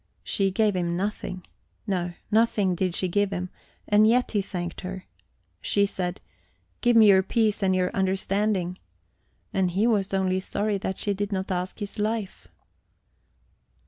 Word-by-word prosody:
She 195 Hz, -1 st, +1 dB
gave 210 Hz, +1 st, +1 dB
him 175 Hz, -1 st, -1 dB
nothing 190 Hz, -2 st, -4 dB, 0.4 s
no, 180 Hz, -4 st, -1 dB, 0.2 s
nothing 215 Hz, -4 st, +3 dB
did 180 Hz, 0 st, -1 dB
she 185 Hz, -, +1 dB
give 205 Hz, +3 st, +1 dB
him 180 Hz, -1 st, -4 dB, 0.4 s
and 210 Hz, +1 st, +5 dB
yet 245 Hz, +2 st, +3 dB
he 205 Hz, -, +1 dB
thanked 175 Hz, -3 st, -5 dB
her. 185 Hz, 0 st, -6 dB, 0.6 s
She 200 Hz, 0 st, +2 dB
said, 180 Hz, -2 st, -3 dB, 0.6 s
"Give 240 Hz, -1 st, +3 dB
me 225 Hz, -1 st, +8 dB
your 190 Hz, -1 st, +7 dB
peace 215 Hz, +1 st, +1 dB
and 190 Hz, -1 st, +2 dB
your 180 Hz, 0 st, +1 dB
understanding!" 190 Hz, -1 st, 0 dB, 0.7 s
and 190 Hz, -2 st, +2 dB
he 195 Hz, +5 st, +1 dB
was 205 Hz, -5 st, +1 dB
only 190 Hz, -1 st, +1 dB
sorry 205 Hz, +1 st, -1 dB
that 190 Hz, 0 st, -4 dB
she 205 Hz, -, 0 dB
did 205 Hz, +1 st, -3 dB
not 190 Hz, -1 st, -2 dB
ask 180 Hz, 0 st, -2 dB
his 205 Hz, -1 st, -6 dB
life. 215 Hz, -1 st, -2 dB
195 Hz, 155 wpm, -26 LUFS, 185-210 Hz, 0.7 s, me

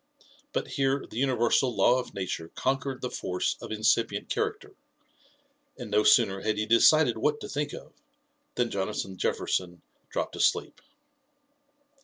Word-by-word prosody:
But -, -, -2 dB
here 135 Hz, 0 st, 0 dB
the 115 Hz, -, -7 dB
universal 125 Hz, -1 st, +2 dB
law 120 Hz, +6 st, +4 dB
of 125 Hz, -, -7 dB
nature 90 Hz, -4 st, -4 dB
conquered 135 Hz, 0 st, -2 dB
the 125 Hz, -, -3 dB
force 90 Hz, 0 st, -2 dB
of -, -, -8 dB
incipient 110 Hz, -1 st, +1 dB
character; 425 Hz, -2 st, -3 dB, 1.0 s
and 120 Hz, -5 st, -8 dB
no 105 Hz, +1 st, +4 dB
sooner 95 Hz, -2 st, +4 dB
had 110 Hz, 0 st, -1 dB
he 105 Hz, -, 0 dB
decided 115 Hz, +2 st, +5 dB
what 150 Hz, +4 st, +1 dB
to -, -, -6 dB
think 145 Hz, +1 st, -3 dB
of, -, -, -10 dB, 0.6 s
than 120 Hz, -1 st, 0 dB
Jonathan 95 Hz, -1 st, -3 dB
Jefferson 90 Hz, -2 st, -2 dB, 0.3 s
dropped -, -, -3 dB
asleep. -, -, 0 dB
120 Hz, 140 wpm, -28 LUFS, 100-135 Hz, 1.0 s, decided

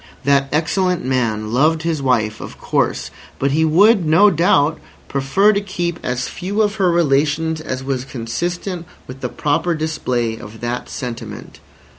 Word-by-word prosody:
That 140 Hz, -1 st, +2 dB
excellent 180 Hz, +2 st, 0 dB
man 115 Hz, -4 st, -1 dB
loved 155 Hz, +5 st, +2 dB
his 165 Hz, -3 st, -1 dB
wife, 115 Hz, -5 st, 0 dB
of -, -, -9 dB
course, -, -, -1 dB, 0.3 s
but 140 Hz, 0 st, 0 dB
he 155 Hz, +3 st, +2 dB
would, 190 Hz, +6 st, +5 dB
no 165 Hz, +7 st, +5 dB
doubt, 160 Hz, -3 st, +2 dB, 0.3 s
prefer 140 Hz, +10 st, +2 dB
to 200 Hz, -, 0 dB
keep 175 Hz, -4 st, -3 dB
as 125 Hz, +1 st, -2 dB
few 200 Hz, +4 st, -1 dB
of 210 Hz, 0 st, -1 dB
her 190 Hz, -3 st, +3 dB
relations 155 Hz, 0 st, +1 dB
as 130 Hz, -4 st, -4 dB
was 130 Hz, -2 st, -2 dB
consistent 170 Hz, -, -4 dB, 0.2 s
with 130 Hz, +1 st, -10 dB
the -, -, -2 dB
proper 155 Hz, +4 st, 0 dB
display 125 Hz, -7 st, -2 dB
of 110 Hz, +1 st, -11 dB
that 120 Hz, +1 st, -3 dB
sentiment. 115 Hz, -4 st, -7 dB
150 Hz, 155 wpm, -19 LUFS, 125-175 Hz, 0.3 s, would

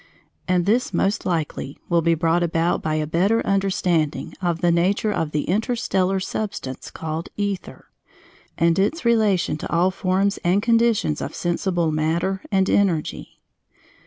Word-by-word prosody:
And 180 Hz, -2 st, +2 dB
this, 220 Hz, -1 st, +1 dB
most 195 Hz, +4 st, 0 dB
likely, 155 Hz, -5 st, -3 dB
will 170 Hz, -1 st, +2 dB
be 165 Hz, 0 st, +2 dB
brought 165 Hz, +1 st, +1 dB
about 170 Hz, 0 st, +1 dB
by 155 Hz, -1 st, -1 dB
a 155 Hz, 0 st, 0 dB
better 190 Hz, +9 st, +1 dB
understanding 185 Hz, -5 st, 0 dB
of 175 Hz, -2 st, -1 dB
the 175 Hz, -, +3 dB
nature 190 Hz, +5 st, +1 dB
of 165 Hz, -6 st, -1 dB
the 150 Hz, -1 st, -1 dB
interstellar 195 Hz, -2 st, 0 dB
substance 190 Hz, -9 st, -5 dB
called 160 Hz, +1 st, -5 dB
Ether, 200 Hz, -2 st, -4 dB, 0.7 s
and 170 Hz, +2 st, +2 dB
its 260 Hz, -, 0 dB
relation 210 Hz, -9 st, +2 dB
to -, -, -7 dB
all 175 Hz, +4 st, +3 dB
forms 195 Hz, +2 st, 0 dB
and 180 Hz, +3 st, +3 dB
conditions 230 Hz, -9 st, +2 dB
of -, -, -5 dB
sensible 175 Hz, -1 st, 0 dB
matter 165 Hz, +5 st, 0 dB
and 190 Hz, -1 st, +2 dB
energy. 180 Hz, -7 st, -1 dB
180 Hz, 145 wpm, -22 LUFS, 165-200 Hz, 0.7 s, the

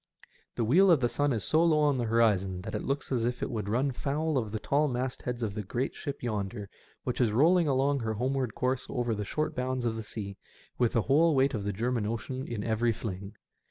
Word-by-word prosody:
The 120 Hz, -, 0 dB
wheel 175 Hz, -, +5 dB
of 165 Hz, -5 st, +6 dB
the 120 Hz, -, +2 dB
sun 145 Hz, +4 st, 0 dB
is 110 Hz, -6 st, -1 dB
so 160 Hz, -, +3 dB
low 155 Hz, -3 st, +4 dB
on 145 Hz, -3 st, +2 dB
the 120 Hz, -, 0 dB
horizon 105 Hz, -5 st, +2 dB
that -, -, -7 dB
it -, -, -2 dB
looks 140 Hz, +1 st, -3 dB
as 120 Hz, -3 st, +1 dB
if 120 Hz, +1 st, -1 dB
it -, -, -2 dB
would 105 Hz, -3 st, -3 dB
run 130 Hz, +6 st, +1 dB
foul 150 Hz, +4 st, -1 dB
of 110 Hz, -6 st, -1 dB
the 110 Hz, -, -2 dB
tall 145 Hz, +7 st, +2 dB
mastheads 125 Hz, -1 st, -3 dB
of 105 Hz, -3 st, -2 dB
the 105 Hz, -, -3 dB
great 120 Hz, +6 st, -2 dB
ship 140 Hz, -2 st, -6 dB
yonder, 105 Hz, -2 st, -3 dB, 0.3 s
which 125 Hz, 0 st, -2 dB
is 115 Hz, -4 st, +3 dB
rolling 165 Hz, +8 st, +4 dB
along 140 Hz, +1 st, +2 dB
her 110 Hz, -2 st, -2 dB
homeward 130 Hz, 0 st, -1 dB
course 130 Hz, 0 st, -1 dB
over 120 Hz, -3 st, -1 dB
the 105 Hz, -1 st, -3 dB
short 155 Hz, +9 st, -2 dB
bounds 125 Hz, -1 st, -2 dB
of 115 Hz, -1 st, 0 dB
the -, -, -3 dB
sea, 100 Hz, -2 st, -6 dB, 0.4 s
with 120 Hz, -2 st, +2 dB
the 115 Hz, -, +2 dB
whole 155 Hz, +3 st, +4 dB
weight 135 Hz, +1 st, +3 dB
of 105 Hz, -4 st, -3 dB
the 105 Hz, -, 0 dB
German 115 Hz, +1 st, -1 dB
Ocean 130 Hz, +4 st, -4 dB
in 110 Hz, -4 st, -4 dB
every 115 Hz, +1 st, +1 dB
fling. 100 Hz, -2 st, -6 dB
120 Hz, 235 wpm, -29 LUFS, 110-135 Hz, 0.4 s, of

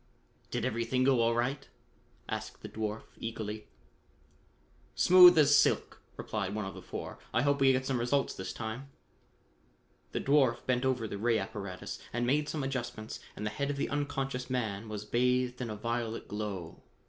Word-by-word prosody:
"Did -, -, -2 dB
everything 115 Hz, +3 st, 0 dB
go 130 Hz, -2 st, +4 dB
all 115 Hz, 0 st, +3 dB
right?" 130 Hz, +3 st, -1 dB, 0.6 s
asked -, -, -5 dB
the -, -, -5 dB
dwarf 110 Hz, 0 st, -3 dB, 0.2 s
eagerly. 110 Hz, -2 st, -5 dB, 1.3 s
"Smooth 180 Hz, -1 st, +9 dB
as 145 Hz, -2 st, +6 dB
silk," -, -, +2 dB, 0.2 s
replied 100 Hz, -2 st, -3 dB
one 110 Hz, -2 st, -2 dB
of 95 Hz, -, -5 dB
the -, -, -9 dB
four. -, -, -7 dB
"I 120 Hz, -, +2 dB
hope 140 Hz, 0 st, +2 dB
we 135 Hz, -1 st, +7 dB
get 130 Hz, 0 st, 0 dB
some 130 Hz, -2 st, 0 dB
results 135 Hz, +4 st, +1 dB
this 95 Hz, 0 st, -5 dB
time." 115 Hz, +6 st, -6 dB, 1.2 s
The -, -, -1 dB
dwarf 135 Hz, -4 st, +3 dB
bent 125 Hz, 0 st, +1 dB
over 125 Hz, -4 st, +1 dB
the 100 Hz, -, -5 dB
ray 115 Hz, +1 st, +2 dB
apparatus 100 Hz, -3 st, -5 dB
and 120 Hz, +1 st, -1 dB
made 150 Hz, +4 st, +1 dB
some 150 Hz, -3 st, -2 dB
adjustments 120 Hz, -5 st, -4 dB, 0.2 s
and 105 Hz, -, -5 dB
the 105 Hz, -, -1 dB
head 140 Hz, +4 st, -2 dB
of 145 Hz, -, -2 dB
the 140 Hz, -, -1 dB
unconscious 135 Hz, -3 st, -2 dB
man 110 Hz, -4 st, -2 dB
was 105 Hz, -1 st, -5 dB
bathed 125 Hz, +2 st, +1 dB
with 125 Hz, -2 st, -3 dB
a 110 Hz, -, -4 dB
violet 115 Hz, +1 st, -3 dB
glow. 100 Hz, -5 st, -5 dB
120 Hz, 170 wpm, -31 LUFS, 110-135 Hz, 1.3 s, Smooth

